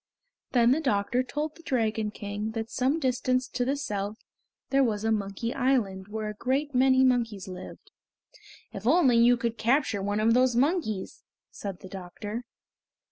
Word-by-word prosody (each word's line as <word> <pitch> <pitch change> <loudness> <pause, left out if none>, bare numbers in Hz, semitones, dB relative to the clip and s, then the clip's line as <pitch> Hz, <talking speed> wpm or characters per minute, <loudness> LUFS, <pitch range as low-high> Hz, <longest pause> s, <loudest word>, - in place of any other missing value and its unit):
Then 240 -1 +5
the 300 +5 +2
doctor 240 -2 +1
told 295 +4 -3
the 330 - -16
Dragon 225 -8 0
King 210 +1 -5
that 225 0 -4
some 265 +5 +1
distance 255 -1 0
to 245 - -1
the 270 +3 0
south 210 -6 -3 0.5
there 275 0 +4
was 215 -4 0
a 225 - +1
Monkey 210 +2 -2
Island 230 -8 0
where 215 0 -4
a 210 - -4
great 270 +7 -1
many 260 +1 +4
monkeys 230 -7 +1
lived. 185 0 -10 0.8
"If 220 - -5
only 270 -5 +5
you 240 +1 +5
could 235 -1 -3
capture 235 -4 +2
one 205 +2 -1
of 225 +1 +4
those 250 0 +3
monkeys?" 255 - 0 0.3
said 195 -3 -7
the 190 - -9
doctor. 200 +5 -7
235 Hz, 165 wpm, -27 LUFS, 210-260 Hz, 0.8 s, Then